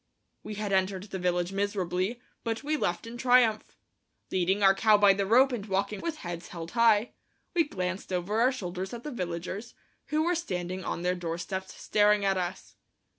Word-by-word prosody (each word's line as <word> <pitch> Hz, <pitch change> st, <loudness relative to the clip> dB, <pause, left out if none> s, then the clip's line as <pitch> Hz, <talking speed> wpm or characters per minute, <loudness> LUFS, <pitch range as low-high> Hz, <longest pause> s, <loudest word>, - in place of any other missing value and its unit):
We 215 Hz, -, -7 dB
had 205 Hz, -1 st, -2 dB
entered 190 Hz, 0 st, +1 dB
the 195 Hz, -2 st, -6 dB
village 180 Hz, 0 st, 0 dB
miserably, 195 Hz, +2 st, -1 dB, 0.2 s
but 230 Hz, +2 st, -2 dB
we 305 Hz, +2 st, 0 dB
left 175 Hz, -9 st, -1 dB
in 230 Hz, +1 st, -8 dB
triumph. 245 Hz, -3 st, +3 dB, 0.5 s
Leading 190 Hz, +2 st, +1 dB
our 195 Hz, 0 st, +7 dB
cow 215 Hz, +2 st, +5 dB
by 205 Hz, -1 st, +6 dB
the 195 Hz, 0 st, -1 dB
rope 255 Hz, +5 st, +5 dB
and 235 Hz, -5 st, -3 dB
walking 200 Hz, +1 st, -1 dB
with 330 Hz, -2 st, -3 dB
heads 170 Hz, 0 st, -5 dB
held 165 Hz, -1 st, -7 dB
high, 230 Hz, -1 st, +4 dB, 0.4 s
we 340 Hz, -2 st, +3 dB
glanced 185 Hz, -6 st, -4 dB
over 185 Hz, +5 st, 0 dB
our 255 Hz, +2 st, +5 dB
shoulders 190 Hz, -3 st, -5 dB
at 235 Hz, -, -9 dB
the 300 Hz, -, -5 dB
villagers, 185 Hz, +1 st, -5 dB, 0.3 s
who 305 Hz, +1 st, +1 dB
were 350 Hz, +2 st, +2 dB
standing 185 Hz, -, -3 dB
on 170 Hz, -, -3 dB
their 180 Hz, 0 st, +2 dB
doorsteps 180 Hz, +2 st, -5 dB
staring 210 Hz, -1 st, +3 dB
at 195 Hz, 0 st, +3 dB
us. 180 Hz, 0 st, -4 dB
195 Hz, 180 wpm, -29 LUFS, 180-230 Hz, 0.5 s, our